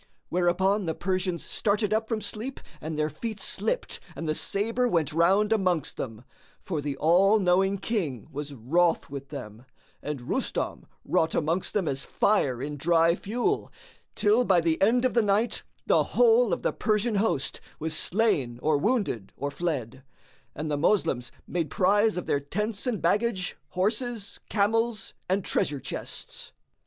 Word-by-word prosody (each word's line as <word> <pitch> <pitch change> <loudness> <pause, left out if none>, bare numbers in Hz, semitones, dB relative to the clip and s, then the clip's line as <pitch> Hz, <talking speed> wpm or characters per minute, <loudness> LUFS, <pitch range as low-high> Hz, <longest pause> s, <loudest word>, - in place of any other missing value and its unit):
Whereupon 180 +3 +2
the 160 - -1
Persians 185 -2 -1
started 210 0 0
up 220 +1 0
from 225 -2 -1
sleep 220 +6 -4 0.2
and 155 0 -4
their 155 0 +1
feet 215 +8 -5
slipped - - -1 0.2
and 165 - -5
the 155 - +1
sabre 230 +9 0
went 165 - +1
round 195 +6 +4
amongst 185 -8 0
them; 115 -2 -5 0.4
for 160 -6 -3
the 140 -1 -3
All 185 +8 +5
knowing 190 0 +3
King 180 - -2
was 145 0 -5
wroth 160 +7 +1
with 140 -1 -7
them, 110 -5 -8 0.4
and 150 -3 -4
Rustam - - -1 0.2
wrought 160 0 +1
amongst 165 +6 0
them 195 -6 +1
as 135 -1 -1
fire 135 - +1
in 145 +1 -4
dry 165 +2 +4
fuel; 240 - -1 0.4
till, 220 +3 +3
by 190 -6 +4
the 165 -1 0
end 240 +5 +4
of 255 - +2
the 235 - +4
night, 210 +3 +1 0.2
the - - +4
whole 480 +1 +4
of - - -1
the - - +1
Persian 215 0 +1
host 195 -10 0 0.2
was 160 +1 -2
slain 160 - +1
or 150 -1 +3
wounded 200 - 0
or 140 +2 -3
fled, 140 -7 -3 0.5
and 155 +1 -3
the 145 - 0
Moslems 140 -9 +1
made 170 -3 -2
prize 205 +2 +3
of 180 - -3
their 140 - +1
tents 210 - -3
and 230 -5 -1
baggage, 195 +1 +1
horses, 215 +3 -2
camels 225 +1 +1 0.2
and 190 +1 +1
treasure 145 -2 0
chests. - - -7
185 Hz, 160 wpm, -27 LUFS, 150-215 Hz, 0.5 s, All